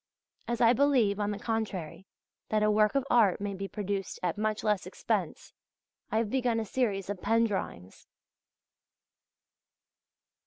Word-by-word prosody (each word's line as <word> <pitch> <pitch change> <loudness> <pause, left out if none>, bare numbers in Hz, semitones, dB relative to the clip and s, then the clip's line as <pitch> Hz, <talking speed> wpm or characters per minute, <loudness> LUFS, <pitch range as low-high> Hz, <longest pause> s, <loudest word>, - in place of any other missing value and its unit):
As 235 0 -2
I 235 0 +6
believe, 250 -7 +3
on 205 0 0
the 205 - -3
contrary, 205 -6 -4 0.4
that 215 -1 +1
a 215 - +4
work 215 +3 +3
of 275 -1 +1
art 220 -6 +4
may 200 0 -3
be 195 +1 -5
produced 200 -1 -4
at 175 -2 0
much 215 0 -1
less 210 -3 0
expense, - - -3 0.6
I 220 - +1
have 220 -2 0
begun 245 -3 +1
a 220 - -2
series 205 -4 -1
of 200 -2 -5
pen 225 +2 +3
drawings. 95 - -5
210 Hz, 150 wpm, -29 LUFS, 200-230 Hz, 0.6 s, I